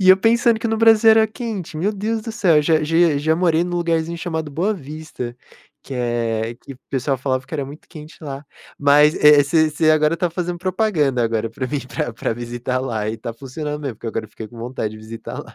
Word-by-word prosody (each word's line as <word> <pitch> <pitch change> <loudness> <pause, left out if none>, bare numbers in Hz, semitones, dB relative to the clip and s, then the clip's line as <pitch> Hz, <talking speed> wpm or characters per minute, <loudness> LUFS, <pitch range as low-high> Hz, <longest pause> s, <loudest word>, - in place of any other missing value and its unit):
e 185 - +3
eu 185 - +9
pensando 230 +2 +3
que 230 - -2
no 225 - 0
Brasil 225 0 +6
era 220 0 +5
quente, 215 -7 -6
meu 195 +7 0
Deus 215 +2 -2
do 225 0 -6
céu, 175 -9 +4
já 155 0 +2
já 165 -1 +3
já 160 +2 +1
morei 170 -1 +2
num 175 0 -3
lugarzinho 170 -1 0
chamado 160 -3 -4
Boa 175 +9 0
Vista, 145 -6 -7 0.5
que 140 - -10
é 115 -2 -1
que 130 - -12
o - - -21
pessoal 135 0 -1
falava 130 0 -2
que - - -22
era 145 -3 -1
muito 145 +3 -12
quente 155 -1 -11
lá, 140 -1 -6 0.3
mas, 145 +2 +5
eh, 150 -1 +8
você 155 +2 +2
você 155 +1 +2
agora 155 +1 +3
tá 175 0 -1
fazendo 175 0 -3
propaganda 175 - +1
agora 115 -1 -1
para 130 +3 -4
mim 145 +1 -2
pra 120 - -3
pra 115 - -2
visitar 120 +2 -3
lá 110 -5 -2
e 110 - -3
tá 115 +1 -6
funcionando 150 +5 -6
mesmo, 135 -6 -4
porque 115 - -9
agora 110 0 -3
eu 105 - -26
fiquei 110 0 -9
com 120 - -13
vontade 115 -2 -3
de - - -10
visitar 110 +1 -8
lá. - - -16
150 Hz, 230 wpm, -20 LUFS, 125-175 Hz, 0.5 s, eu